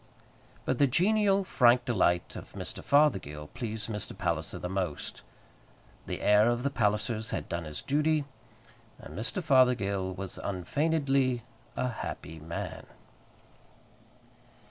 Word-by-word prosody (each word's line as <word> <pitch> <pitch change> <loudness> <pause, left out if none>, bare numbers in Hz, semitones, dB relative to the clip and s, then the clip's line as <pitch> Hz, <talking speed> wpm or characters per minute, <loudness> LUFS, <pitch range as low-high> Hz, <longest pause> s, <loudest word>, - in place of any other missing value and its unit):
But - - 0
the 140 - +6
genial, 195 - +3
frank 125 -8 +4
delight 90 -7 +1
of - - -9
Mr. - - -6
Fothergill 95 - +2
pleased 110 -3 -3
Mr. 105 -3 -5
Palliser - - -1
the - - -4
most. 90 -5 -3 0.9
The - - -4
heir 105 +2 +5
of 120 +1 0
the 140 - 0
Pallisers 110 -1 0
had - - -3
done 85 -1 -3
his 75 -1 -4
duty, 150 +1 +1 0.7
and 75 - -11
Mr. 120 - -2
Fothergill 110 - +3
was 95 0 -5
unfeignedly 135 - 0 0.3
a 125 - 0
happy 80 -8 -6
man. 80 +2 -6
120 Hz, 120 wpm, -30 LUFS, 95-140 Hz, 0.9 s, the